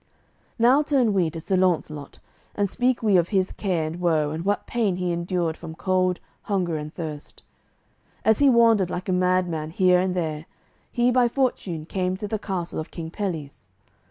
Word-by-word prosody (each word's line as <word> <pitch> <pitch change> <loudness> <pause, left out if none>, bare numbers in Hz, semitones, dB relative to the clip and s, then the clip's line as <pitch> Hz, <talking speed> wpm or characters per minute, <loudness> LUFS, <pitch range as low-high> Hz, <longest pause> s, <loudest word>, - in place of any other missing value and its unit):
Now 250 +5 +5
turn 270 -7 +2
we 180 -4 +2
to 165 +1 -7
Sir 190 +4 -1
Launcelot, 165 -5 0 0.4
and 205 -1 +1
speak 245 +4 0
we 205 -4 +4
of 175 0 +2
his 190 -3 +1
care 180 -6 -1
and 160 +3 -5
woe 160 -4 +1
and 160 +2 -4
what 205 +2 0
pain 220 -6 0
he 180 -1 -1
endured 170 -1 -1
from 165 -1 -9
cold, 185 0 +1 0.2
hunger, 185 -6 -1
and 150 0 -5
thirst. 155 -4 -8 0.8
As 220 -1 +4
he 285 -1 +6
wandered 230 -6 +4
like 180 +2 -4
a - - +2
mad 180 0 +2
man 155 -2 -4
here 180 +1 +3
and 185 0 0
there, 155 -3 -3 0.4
he 240 +1 +2
by 245 -1 +4
fortune 230 - -1
came 185 +1 -2
to 210 - -5
the 215 +1 -2
castle 180 -5 -4
of 155 - -5
King 165 -2 -7
Pelles. 160 - -5
185 Hz, 185 wpm, -24 LUFS, 165-205 Hz, 0.8 s, he